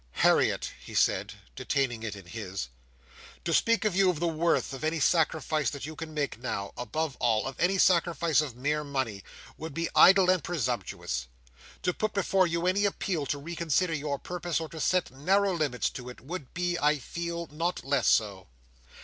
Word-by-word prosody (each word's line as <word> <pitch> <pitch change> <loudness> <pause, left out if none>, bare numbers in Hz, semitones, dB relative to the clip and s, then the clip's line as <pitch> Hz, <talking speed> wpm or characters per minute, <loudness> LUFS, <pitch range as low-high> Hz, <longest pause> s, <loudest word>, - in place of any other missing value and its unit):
"Harriet," - - +3
he - - -10
said, - - +2 0.2
detaining 125 - -1
it 110 -2 -4
in 100 -3 -11
his. 95 - -5 0.8
"To - - 0
speak 230 0 +3
to 215 - +2
you 190 +1 +4
of 170 -4 -1
the 170 - +1
worth 165 -3 +1
of 135 - -7
any 160 +1 0
sacrifice 155 -1 +2
that 140 -2 -6
you 155 +1 -7
can 160 0 -7
make 145 -6 -2
now—above 125 +6 -3
all, 115 -3 +1
of 135 0 -4
any 190 +2 +2
sacrifice 170 -4 +3
of 140 -6 -5
mere 150 +4 -1
money—would 135 - -6
be 165 0 -1
idle 190 -1 +7
and 185 -5 +1
presumptuous. 120 - -2 0.6
To 180 - +1
put 215 +3 -2
before 190 -1 +3
you 170 +1 -1
any 195 +3 +2
appeal 180 -7 -1
to 145 - -1
reconsider 170 +2 -1
your 145 -2 -2
purpose 175 +1 -3
or 160 -1 -5
to 160 - -8
set 180 +1 +1
narrow 190 +9 +2
limits 150 -7 0
to 125 -1 -8
it, 125 - -10
would 150 0 -7
be, 175 0 0
I 150 +1 +3
feel, 170 +5 -5
not 165 +4 -2
less 135 -1 +1
so. 100 -4 +2
155 Hz, 180 wpm, -29 LUFS, 135-175 Hz, 0.8 s, idle